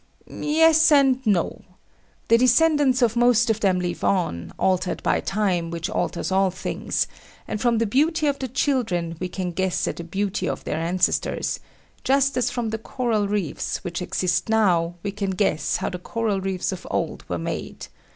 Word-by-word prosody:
Yes, 320 Hz, +1 st, +4 dB
and 270 Hz, -3 st, +4 dB
no. 190 Hz, -5 st, +1 dB, 0.7 s
The 230 Hz, +1 st, +6 dB
descendants 260 Hz, +1 st, +4 dB
of 230 Hz, -1 st, +2 dB
most 240 Hz, -1 st, +4 dB
of 220 Hz, -, -1 dB
them 190 Hz, -4 st, +2 dB
live 175 Hz, -1 st, -3 dB
on, 170 Hz, -, 0 dB
altered 185 Hz, -1 st, 0 dB
by -, -, +2 dB
time, 190 Hz, -5 st, -1 dB
which 170 Hz, 0 st, -4 dB
alters 175 Hz, -, -2 dB
all 190 Hz, 0 st, +3 dB
things; 185 Hz, -, -2 dB, 0.4 s
and 215 Hz, -, -4 dB
from 240 Hz, -2 st, +2 dB
the 230 Hz, -, +1 dB
beauty 305 Hz, +8 st, +1 dB
of 285 Hz, -1 st, 0 dB
the 260 Hz, -, -3 dB
children 225 Hz, -, -1 dB
we 180 Hz, -, -3 dB
can 180 Hz, -1 st, -3 dB
guess 190 Hz, +1 st, -1 dB
at -, -, -3 dB
the 170 Hz, -, -5 dB
beauty 190 Hz, +2 st, -2 dB
of -, -, -4 dB
their -, -, -3 dB
ancestors; 175 Hz, +2 st, 0 dB, 0.4 s
just 275 Hz, +1 st, +2 dB
as 250 Hz, -, +1 dB
from 235 Hz, -3 st, -3 dB
the 220 Hz, -, -3 dB
coral 225 Hz, -3 st, -1 dB
reefs 200 Hz, -7 st, -2 dB
which 175 Hz, -1 st, -4 dB
exist 180 Hz, +2 st, -1 dB
now 175 Hz, -6 st, +2 dB
we 200 Hz, -, -2 dB
can 200 Hz, -1 st, -3 dB
guess 190 Hz, -4 st, 0 dB
how -, -, -2 dB
the 180 Hz, -, -5 dB
coral 210 Hz, 0 st, -2 dB
reefs 190 Hz, -1 st, -2 dB
of 185 Hz, -1 st, -7 dB
old -, -, -2 dB
were -, -, -1 dB
made. -, -, -5 dB
205 Hz, 180 wpm, -23 LUFS, 180-250 Hz, 0.7 s, The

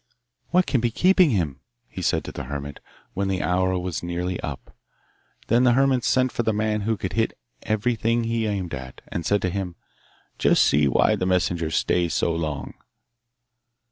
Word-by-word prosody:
'What 180 Hz, +1 st, +3 dB
can 130 Hz, -, +1 dB
be 120 Hz, -, +1 dB
keeping 185 Hz, -, +4 dB
him,' 85 Hz, -, -1 dB, 0.3 s
he -, -, -7 dB
said -, -, +1 dB
to -, -, -7 dB
the -, -, -6 dB
hermit 70 Hz, +1 st, -6 dB, 0.3 s
when 100 Hz, +1 st, -1 dB
the 95 Hz, -3 st, -1 dB
hour 95 Hz, +2 st, +1 dB
was 90 Hz, -2 st, -3 dB
nearly 85 Hz, +1 st, -3 dB
up. -, -, -7 dB, 0.7 s
Then 120 Hz, +2 st, +3 dB
the 125 Hz, -1 st, +5 dB
hermit 130 Hz, -1 st, +3 dB
sent 130 Hz, -1 st, +2 dB
for -, -, -1 dB
the 110 Hz, -, +1 dB
man 105 Hz, 0 st, 0 dB
who 110 Hz, +1 st, 0 dB
could -, -, -4 dB
hit -, -, 0 dB, 0.2 s
everything 115 Hz, +2 st, 0 dB
he 115 Hz, -1 st, -1 dB
aimed 95 Hz, -5 st, -3 dB
at, 65 Hz, 0 st, -7 dB
and 85 Hz, -, -3 dB
said 100 Hz, 0 st, +1 dB
to 90 Hz, -, 0 dB
him, 90 Hz, -2 st, -4 dB, 0.6 s
'Just -, -, +4 dB
see 75 Hz, 0 st, +3 dB
why -, -, +3 dB
the 90 Hz, -, -2 dB
messenger 90 Hz, -3 st, +1 dB
stays 85 Hz, 0 st, +1 dB
so 85 Hz, -, +1 dB
long. 75 Hz, -4 st, -3 dB
95 Hz, 180 wpm, -24 LUFS, 85-115 Hz, 0.7 s, the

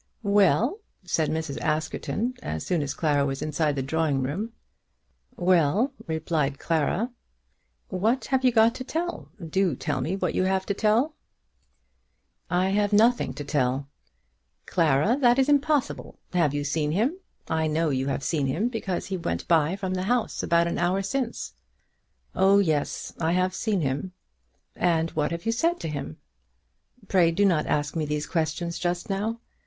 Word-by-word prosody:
"Well?" 205 Hz, -, +3 dB, 0.2 s
said 165 Hz, -3 st, 0 dB
Mrs. 160 Hz, -3 st, -3 dB
Askerton 160 Hz, +10 st, -1 dB
as 80 Hz, 0 st, -4 dB
soon 175 Hz, -4 st, 0 dB
as 140 Hz, -1 st, -3 dB
Clara 145 Hz, -3 st, +2 dB
was 135 Hz, -1 st, -2 dB
inside 150 Hz, -1 st, 0 dB
the 135 Hz, -, -1 dB
drawing 145 Hz, -1 st, 0 dB
room. 190 Hz, -, -3 dB, 0.8 s
"Well," 185 Hz, -, +2 dB
replied 160 Hz, -3 st, -1 dB
Clara. 170 Hz, -, 0 dB, 0.8 s
"What 220 Hz, +8 st, 0 dB
have 265 Hz, 0 st, +3 dB
you 255 Hz, -, +5 dB
got 225 Hz, 0 st, +5 dB
to 255 Hz, -, -6 dB
tell? 335 Hz, +6 st, -4 dB, 0.2 s
Do 185 Hz, -2 st, +1 dB
tell 135 Hz, 0 st, -2 dB
me 165 Hz, +8 st, -1 dB
what 195 Hz, -, -1 dB
you 185 Hz, -, +1 dB
have 190 Hz, 0 st, 0 dB
to 200 Hz, -, -1 dB
tell." 225 Hz, +9 st, +2 dB, 1.4 s
"I 180 Hz, +1 st, +2 dB
have 205 Hz, +1 st, +1 dB
nothing 230 Hz, +4 st, +3 dB
to 145 Hz, -, -5 dB
tell." 140 Hz, -1 st, 0 dB, 0.8 s
"Clara, 165 Hz, -, +2 dB
that 245 Hz, -1 st, +5 dB
is 265 Hz, 0 st, +3 dB
impossible. 290 Hz, -1 st, +1 dB, 0.2 s
Have 170 Hz, -5 st, +3 dB
you 145 Hz, -, -1 dB
seen 150 Hz, +1 st, 0 dB
him? 250 Hz, -, 0 dB, 0.3 s
I 160 Hz, 0 st, 0 dB
know 155 Hz, 0 st, +1 dB
you 135 Hz, 0 st, -1 dB
have 140 Hz, 0 st, -2 dB
seen 145 Hz, -5 st, 0 dB
him, 175 Hz, -, 0 dB
because 205 Hz, -7 st, -3 dB
he 190 Hz, -1 st, -3 dB
went 85 Hz, -, -3 dB
by 165 Hz, +1 st, +3 dB
from 190 Hz, -1 st, -3 dB
the 185 Hz, -, -1 dB
house 245 Hz, -2 st, 0 dB
about 170 Hz, 0 st, +3 dB
an 170 Hz, -, -2 dB
hour 180 Hz, +3 st, +1 dB
since." 245 Hz, +3 st, -3 dB, 0.8 s
"Oh 195 Hz, +1 st, +5 dB
yes; 160 Hz, -7 st, 0 dB
I 165 Hz, 0 st, +1 dB
have 185 Hz, +1 st, +1 dB
seen 205 Hz, -4 st, 0 dB
him." 140 Hz, +6 st, -2 dB, 0.6 s
"And 165 Hz, -2 st, +1 dB
what 150 Hz, -1 st, 0 dB
have 170 Hz, +3 st, -5 dB
you 225 Hz, -, +2 dB
said 335 Hz, +9 st, +1 dB
to -, -, -3 dB
him?" 140 Hz, -, -5 dB, 0.9 s
"Pray 180 Hz, -3 st, +4 dB
do 190 Hz, +5 st, +2 dB
not 170 Hz, -6 st, +2 dB
ask 150 Hz, +1 st, -1 dB
me 155 Hz, -2 st, -1 dB
these 150 Hz, 0 st, -2 dB
questions 165 Hz, +1 st, -2 dB
just 175 Hz, 0 st, -2 dB
now. 210 Hz, +4 st, -2 dB
175 Hz, 165 wpm, -26 LUFS, 150-210 Hz, 1.4 s, you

